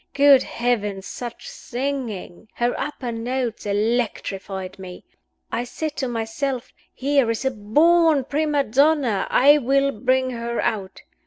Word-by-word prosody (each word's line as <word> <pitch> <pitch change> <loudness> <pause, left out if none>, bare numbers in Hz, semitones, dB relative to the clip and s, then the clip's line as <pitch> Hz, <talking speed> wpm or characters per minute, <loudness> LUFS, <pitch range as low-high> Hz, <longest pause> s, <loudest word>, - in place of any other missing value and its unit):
Good 280 -1 +7
Heavens, 210 -5 -2
such 240 -2 -7
singing! 240 -7 -5
Her 240 0 +1
upper 265 -3 -4
notes 235 -1 -3
electrified 200 -3 -2
me. 180 -1 -9 0.5
I 240 - -1
said 300 +5 -5
to 265 - -1
myself; 240 +3 -3 0.2
'Here 275 -3 +1
is 230 +3 -2
a 265 - +2
born 300 +7 +3
prima 290 +1 0
donna 270 -4 +2
I 290 +3 +6
will 275 +1 +2
bring 260 +2 +1
her 235 0 -3
out! 195 -4 -2
245 Hz, 130 wpm, -22 LUFS, 220-275 Hz, 0.5 s, Good